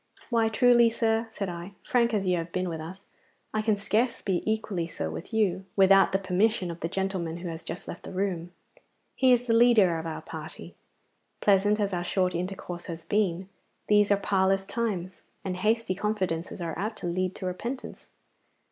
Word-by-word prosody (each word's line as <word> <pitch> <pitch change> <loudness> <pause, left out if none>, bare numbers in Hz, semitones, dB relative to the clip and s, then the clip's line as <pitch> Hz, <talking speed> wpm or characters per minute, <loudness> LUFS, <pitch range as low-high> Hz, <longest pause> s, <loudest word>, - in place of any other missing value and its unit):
'Why 225 -1 +3
truly, 240 0 +5
sir,' 225 0 0
said 205 -3 -4
I, 175 +2 -7
'frank 240 -1 +2
as 205 -3 0
you 180 -1 +2
have 165 0 -4
been 185 0 -1
with 160 -1 -4
us, 185 +5 -9 0.5
I 215 - +1
can 215 -1 +1
scarce 220 +4 0
be 185 -3 0
equally 200 -6 -2
so 80 - -4
with 80 - -7
you, 205 -4 +1
without 195 0 +6
the 195 - +3
permission 195 0 +1
of 170 - -8
the 165 - -2
gentleman 185 -3 -2
who 175 0 -5
has 160 -1 -6
just 170 - -7
left - - -7
the - - -9
room. 180 -3 -2 0.6
He 260 -1 +4
is 245 0 +4
the 230 - +1
leader 225 -8 +5
of 160 - -5
our 160 - -5
party. - - -9 0.7
Pleasant 205 +1 +3
as 200 -2 0
our 175 -1 -1
short 180 0 0
intercourse 175 0 -5
has 165 -2 -6
been, 185 -1 0 0.4
these 210 -1 +5
are 200 - +4
parlous 195 -1 +1
times, 195 -5 -3 0.2
and 185 -1 -2
hasty 220 +1 +1
confidences 185 -4 -2
are 165 -2 -3
apt 215 +2 -3
to - - -7
lead 185 +1 -1
to - - -6
repentance. 235 +8 -5
195 Hz, 190 wpm, -27 LUFS, 175-215 Hz, 0.7 s, without